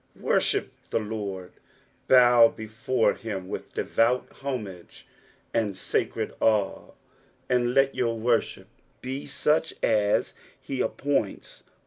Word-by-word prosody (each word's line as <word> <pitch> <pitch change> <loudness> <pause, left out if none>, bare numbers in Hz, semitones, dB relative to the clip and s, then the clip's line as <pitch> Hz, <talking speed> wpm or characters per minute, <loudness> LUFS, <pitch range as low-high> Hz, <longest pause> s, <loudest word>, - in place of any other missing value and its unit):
" - - -39
Wor*hip - - +1 0.2
tht 110 -2 -1
Lord," 100 -4 -5 0.6
bow 120 -2 +7
before 110 +3 -1
him 100 -5 -6
with - - -7
devout 120 +2 +1
liomnge 110 -10 -7 0.5
itnd 105 -5 -2
Hacred - - -1
awe, 105 -3 +1 0.5
and 125 -1 +1
let 135 0 +4
your 115 -2 -1
worship 115 +1 0 0.3
be 130 +2 -5
such 155 +2 +1
as 105 -2 +2 0.3
h* 135 -2 -3
appointa. 140 -8 -2
115 Hz, 110 wpm, -26 LUFS, 105-125 Hz, 0.6 s, bow